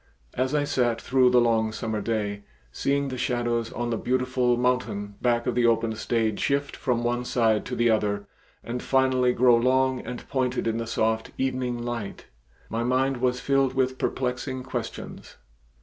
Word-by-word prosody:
As 130 +3 0
I 145 - +2
sat 120 -5 +1
through 130 0 +3
the 125 0 +5
long 115 -2 +2
summer 110 -1 -3
day, 105 -2 -2 0.3
seeing 140 - 0
the 130 -1 -5
shadows 120 -2 -1
on 120 0 -3
the 115 - -1
beautiful 125 -1 +1
mountain 125 -5 -1
back 120 -1 +1
of 125 - 0
the 120 0 +3
open 115 -1 +2
stage 110 -1 -1
shift 140 0 0
from 120 -2 -1
one 120 +1 0
side 115 -3 +1
to 125 - -3
the 120 -1 +3
other 105 -2 0 0.4
and 120 +1 -4
finally 130 -2 +2
grow 125 0 +5
long 130 +2 +2
and 125 0 -7
pointed 130 -2 -1
in 115 0 0
the 115 -1 -3
soft 110 0 0
evening 130 -2 -1
light, 120 -4 -5 0.4
my 115 - -2
mind 130 +2 +1
was 125 0 0
filled 135 0 +1
with 130 0 0
perplexing 130 0 -2
questions. 130 - -6
125 Hz, 170 wpm, -26 LUFS, 115-130 Hz, 0.4 s, the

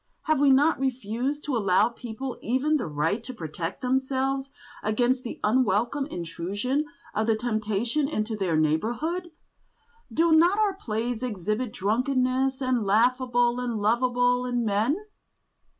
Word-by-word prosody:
Have 310 -4 +1
we 285 -1 +5
not 280 +4 +4
refused 260 +2 -2
to 285 - -2
allow 200 0 +3
people 245 +2 -7
even 265 +6 +1
the 255 - -3
right 155 +9 -1
to 255 +1 -8
protect 165 0 -5
themselves 265 +1 0 0.3
against 245 +4 +1
the 240 - -7
unwelcome 240 +4 +1
intrusion 200 - -2 0.3
of 215 +1 0
the 225 - +3
temptation 220 +4 -1
into 220 -6 -2
their 185 -6 0
neighbourhood? 240 - 0 0.8
Do 335 +1 +2
not 340 +5 +5
our 425 -2 +2
plays 235 - -3
exhibit 215 0 -2
drunkenness 255 +5 0
as 255 0 +1
laughable 240 +3 +2
and 245 -2 -2
lovable 245 +3 +2
in 245 -1 0
men? 220 - +1
245 Hz, 135 wpm, -26 LUFS, 215-265 Hz, 0.8 s, we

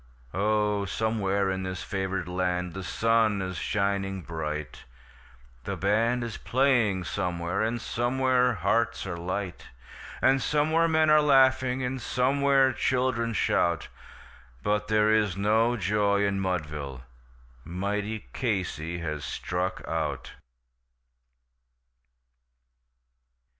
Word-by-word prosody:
Oh, 105 0 +1
somewhere 100 -2 0
in 95 0 -2
this 95 -1 -4
favoured 95 -2 -3
land 90 -1 -1
the 95 - -6
sun 110 +2 +2
is 95 -1 -4
shining 95 0 -1
bright, 75 -4 -5 0.8
The - - -3
band 115 +5 +1
is 115 -2 -5
playing 120 -7 +2
somewhere, 90 0 -2
and 115 +2 0
somewhere 125 +2 +1
hearts 115 +6 0
are 90 -2 -4
light, 90 +2 -4 0.5
And 135 0 +3
somewhere 155 +6 +2
men 160 -1 +3
are 155 0 +6
laughing, 130 -2 +3
and 125 0 -3
somewhere 135 +2 +2
children 125 -3 0
shout; 85 -5 +1 0.7
But 105 0 0
there 110 0 +3
is 105 -4 +1
no 110 +4 +2
joy 100 +1 +1
in 100 -1 0
Mudville 75 -8 -3 0.6
mighty 100 +5 -3
Casey 90 - -2
has 75 -3 -4
struck 90 +4 -3
out. - - -3
105 Hz, 105 wpm, -27 LUFS, 90-120 Hz, 0.8 s, are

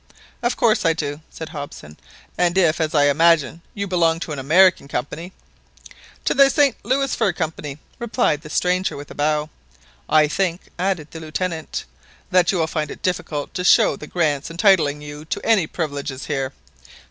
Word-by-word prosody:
"Of 240 +1 0
course 220 -2 +3
I 165 -1 +3
do," 145 -1 -4
said 160 - -8
Hobson; 145 - -8 0.4
"and 175 0 +1
if, 165 -3 +3
as 160 +1 -1
I 145 - +5
imagine, 165 +1 +3
you 200 -1 -2
belong 170 -3 +2
to 160 - -5
an 145 - -4
American 170 +3 +4
company— 150 +7 -4 0.9
"To - - +2
the 275 -1 +6
St 280 -4 +3
Louis 270 +3 0
Fur 220 -5 +1
Company," 155 -4 -4 0.2
replied 235 - 0
the 155 - -11
stranger 180 +2 0
with 145 0 -9
a - - -7
bow. 150 +1 0 0.6
"I 155 -1 +5
think," 180 +2 -1 0.2
added 180 -5 -1
the 165 - -8
Lieutenant, 160 +1 -4 0.5
"that 180 -1 +4
you 190 - -1
will 165 - +2
find 155 -2 -3
it - - -10
difficult 155 -5 -2
to 180 -1 -3
show 180 - +5
the 150 - -10
grants 150 -5 0
entitling 165 -5 +3
you 145 0 -8
to - - -4
any 210 -8 +3
privileges 145 -5 -4
here." 135 -3 -2
165 Hz, 175 wpm, -21 LUFS, 150-185 Hz, 0.9 s, the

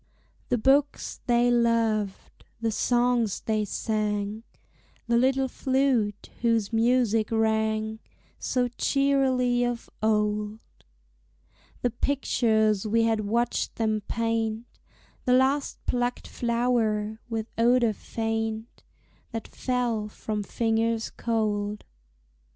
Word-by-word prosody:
The 245 - +2
books 275 +5 +1
they 240 0 +4
loved, 230 -4 0 0.2
the 225 -1 0
songs 240 -2 +1
they 215 -1 0
sang, 210 0 -2 0.6
The 235 - +1
little 265 +2 +3
flute 255 -6 0
whose 230 -2 +1
music 225 -2 +2
rang 220 -1 0 0.4
So 250 -1 0
cheerily 260 -1 +2
of 240 -1 -3
old; 210 0 0 1.2
The 245 - +2
pictures 220 -5 +1
we 225 +2 +3
had 220 -2 +1
watched 235 +3 0
them 215 -2 0
paint, 225 0 -1 0.6
The 250 - +3
last 270 +2 +2
plucked 245 0 -1
flower, 230 -3 0
with 225 -2 -2
odor 235 -1 +3
faint, 225 +1 -4 0.5
That 225 -1 -5
fell 240 -4 -1
from 210 0 -4
fingers 225 +1 0
cold. 210 -2 -1
225 Hz, 100 wpm, -26 LUFS, 215-245 Hz, 1.2 s, they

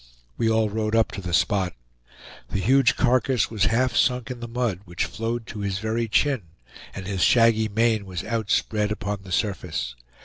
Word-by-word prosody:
We 115 - +1
all 110 -1 +2
rode 110 +1 -1
up 115 -1 +3
to 100 - -6
the 90 -1 -5
spot. 90 +2 +1 0.7
The 100 - -2
huge 130 +6 +4
carcass 125 -1 +2
was 110 -3 +1
half 120 +3 +1
sunk 125 -1 +1
in 125 - -6
the 120 - -6
mud, 115 -6 -1
which 85 -1 -2
flowed 115 +1 -3
to 105 - -7
his 100 -1 -2
very 110 +2 -1
chin, 135 +3 +2 0.5
and 95 - -6
his 95 -1 -3
shaggy 115 0 +4
mane 110 -1 +1
was 90 -3 -5
outspread 110 -1 0
upon 105 -1 -3
the 95 -1 -12
surface. 85 - -2
110 Hz, 180 wpm, -24 LUFS, 100-115 Hz, 0.7 s, huge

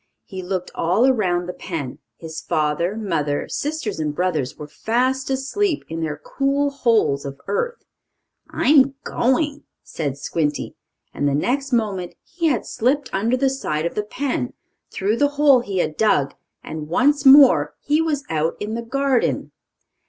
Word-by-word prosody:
He 190 -2 -7
looked 185 0 -4
all 185 +9 +2
around 185 -9 +2
the 180 - -5
pen. 145 -10 -5 0.2
His 160 -1 -7
father, 155 +5 0
mother, 165 -9 -1
sisters 290 - -3
and 150 -1 -2
brothers 160 -7 -1
were 150 - -8
fast 250 - -1
asleep 290 +6 0
in 165 0 -4
their 150 -2 -2
cool 275 - 0
holes 225 - +2
of 140 0 -7
earth. 470 - -2 0.6
"I'm 275 -1 +4
going!" 285 +4 0 0.2
said 140 -4 -4
Squinty, 150 0 -2 0.4
and 145 - 0
the 140 - +1
next 270 - -1
moment 205 -7 -1
he 330 0 -2
had 260 -8 0
slipped 265 +4 0
under 225 +6 +1
the 270 +1 +2
side 165 - -2
of 170 - -2
the 210 - -1
pen, 210 - -3 0.4
through 205 +4 -1
the 290 - +4
hole 285 -3 +6
he 200 -5 -4
had 155 -3 -1
dug, 195 -11 +2 0.3
and 155 -1 -6
once 280 - +2
more 265 - +7
he 300 +2 +1
was 300 -4 -1
out 160 -3 0
in 210 +1 -4
the 230 - -2
garden. 270 +1 0
215 Hz, 160 wpm, -21 LUFS, -, 0.6 s, more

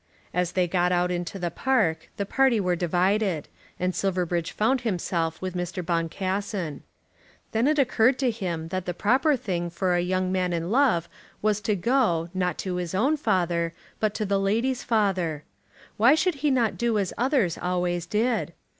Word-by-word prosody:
As 180 -1 0
they 180 -1 +2
got 180 0 +1
out 180 0 +2
into 175 +2 -3
the 175 -2 -2
park 180 -9 0
the 200 - -1
party 260 +1 +3
were 180 -2 +1
divided, 180 0 +1 0.3
and 185 +1 0
Silverbridge 180 -3 -1
found 245 +4 +1
himself 175 -7 -1
with 185 -1 -3
Mr. 180 0 -4
Boncassen. 180 0 -2 0.7
Then 225 +4 +2
it 305 +1 +2
occurred 250 -2 +3
to 255 -2 +1
him 175 -7 -4
that 185 +1 -3
the 180 - -2
proper 265 - +3
thing 175 -7 -3
for 180 +2 0
a 175 - +2
young 185 +1 0
man 185 -1 0
in 170 +2 -2
love 230 - +3 0.4
was 210 -1 +2
to 210 -1 0
go, 200 -6 +1
not 180 -1 -1
to 185 -2 -3
his 180 0 -3
own 265 +10 +3
father, 170 - 0 0.3
but 215 -1 0
to 215 - -1
the 200 0 +1
lady's 230 +6 0
father. 185 -9 0 0.5
Why 240 +7 +6
should 320 -3 0
not 240 -4 +2
he - - -13
do 235 -2 +1
as 195 -3 -1
others 245 - +1
always 175 -1 -1
did? 215 -3 0
185 Hz, 175 wpm, -26 LUFS, 175-225 Hz, 0.7 s, Why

